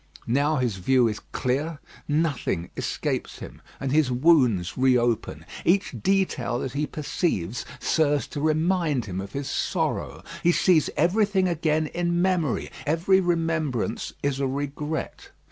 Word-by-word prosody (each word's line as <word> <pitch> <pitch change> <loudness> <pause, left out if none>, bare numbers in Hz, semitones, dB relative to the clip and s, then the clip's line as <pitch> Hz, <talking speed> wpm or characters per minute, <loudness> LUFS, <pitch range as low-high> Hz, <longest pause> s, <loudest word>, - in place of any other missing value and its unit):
Now 145 +6 +2
his 125 -7 0
view 125 +6 +3
is 105 -2 -3
clear, 145 +5 -1 0.3
nothing 145 - -1
escapes - - -3
him; - - -10 0.2
and 135 -1 -2
his 150 -2 +3
wounds 125 - +3
re 130 -1 +4
open. 120 -2 -1 0.2
Each 195 +3 +2
detail 190 -11 +1
that 130 - -3
he 145 +2 -1
perceives 130 - -2
serves 145 -1 +1
to 145 - -5
remind 155 -3 +1
him 95 -2 -4
of 95 - -9
his 140 0 -3
sorrow. - - -2 0.2
He 175 - +4
sees 170 -5 +3
everything 190 +3 +2
again 155 -2 +1
in 175 +2 -1
memory, 175 -7 0
every 165 +5 +3
remembrance 165 - -1
is 140 -1 0
a 135 - +1
regret. 145 +3 -4
150 Hz, 140 wpm, -25 LUFS, 130-170 Hz, 0.3 s, re